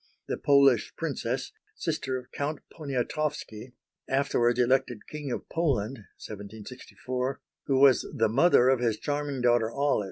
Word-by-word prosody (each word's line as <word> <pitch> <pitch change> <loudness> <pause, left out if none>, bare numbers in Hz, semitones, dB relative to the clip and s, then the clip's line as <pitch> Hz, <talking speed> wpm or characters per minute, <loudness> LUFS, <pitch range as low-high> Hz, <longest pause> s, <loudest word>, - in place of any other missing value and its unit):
the - - -1
Polish 140 -5 +4
Princess, - - -3 0.2
sister 130 -1 -2
of 125 -1 -11
Count 145 +2 -3 0.2
Poniatowski, 135 -4 -3 0.4
afterwards 125 -3 +2
elected 125 -2 +1
King 150 -3 -6
of - - -4
Poland 135 -8 -1 0.2
(1764), 125 +5 -6 0.3
who 135 -1 +2
was 135 -2 +5
the 115 - +1
mother 125 +2 +4
of 130 -2 +3
his 115 -3 0
charming 145 -1 -3
daughter, 120 -2 +3
Olive. 140 +4 +1
130 Hz, 130 wpm, -28 LUFS, 120-140 Hz, 0.4 s, was